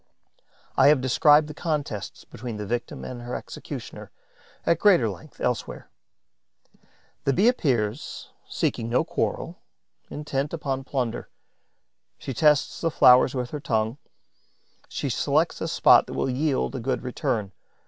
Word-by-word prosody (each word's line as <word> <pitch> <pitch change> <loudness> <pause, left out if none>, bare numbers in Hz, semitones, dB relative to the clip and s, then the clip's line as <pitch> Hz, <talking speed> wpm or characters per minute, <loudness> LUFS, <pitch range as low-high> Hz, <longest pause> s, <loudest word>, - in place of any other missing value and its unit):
I - - +6
have 145 -1 +6
described 150 +4 +4
the 150 - -7
contests 145 - -4
between 120 -2 -7
the 105 - -5
victim 120 +3 -4
and 125 -2 -7
her 120 +1 -5
executioner, - - -8 0.6
at 170 -1 +2
greater 180 - +5
length, 125 +9 -9
elsewhere. 125 -2 -3 1.3
The 140 - +3
Bee 200 - +3
appears, 130 - -1 0.2
seeking 115 0 -1
no 120 - +2
quarrel, - - -3 0.5
intent 145 0 -3
upon 135 -4 -3
plunder. 125 -4 -3 0.9
She 135 - -6
tests 150 +3 +2
the 165 - +1
flowers 130 -2 +6
with 125 -1 -3
her 150 - -4
tongue; 115 0 -1 0.9
she - - -3
selects - - 0
a - - -1
spot - - +5
that - - -7
will 135 - -1
yield 140 +1 0
a 130 - -4
good 130 +3 -2
return. 110 -5 -2
130 Hz, 140 wpm, -25 LUFS, 120-150 Hz, 1.3 s, I